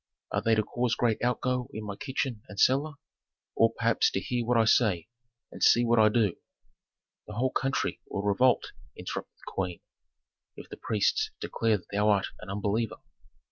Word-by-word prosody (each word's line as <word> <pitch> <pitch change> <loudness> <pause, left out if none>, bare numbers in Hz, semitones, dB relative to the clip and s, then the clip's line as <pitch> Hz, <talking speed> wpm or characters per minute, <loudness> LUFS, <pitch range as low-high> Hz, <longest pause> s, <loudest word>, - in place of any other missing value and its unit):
Are - - 0
they 115 0 +3
to 110 - +2
cause 120 +1 -1
great 115 -2 0
outgo 125 +1 0
in 110 - -5
my 100 -1 -5
kitchen 130 -2 -3
and 100 - -8
cellar? 140 +4 +3 0.6
Or, 115 0 +4
perhaps, 115 0 +2
to - - -2
hear 120 +4 -2
what 120 -1 +3
I 115 - +4
say, 105 -5 +2 0.4
and - - -11
see 120 +1 +5
what 120 0 +3
I 110 0 +6
do?" 105 -4 +1 0.9
"The 105 - -8
whole 130 +3 0
country 135 0 -1
will 100 - -3
revolt," 115 +5 +2 0.3
interrupted - - -6
the - - -8
queen, 90 -2 -3 0.7
"if - - -11
the - - -9
priests 105 -3 0
declare 115 -2 0
that 90 - -16
thou 105 +1 +2
art 100 -2 +3
an - - -10
unbeliever." 105 +3 -1
115 Hz, 180 wpm, -28 LUFS, 105-120 Hz, 0.9 s, I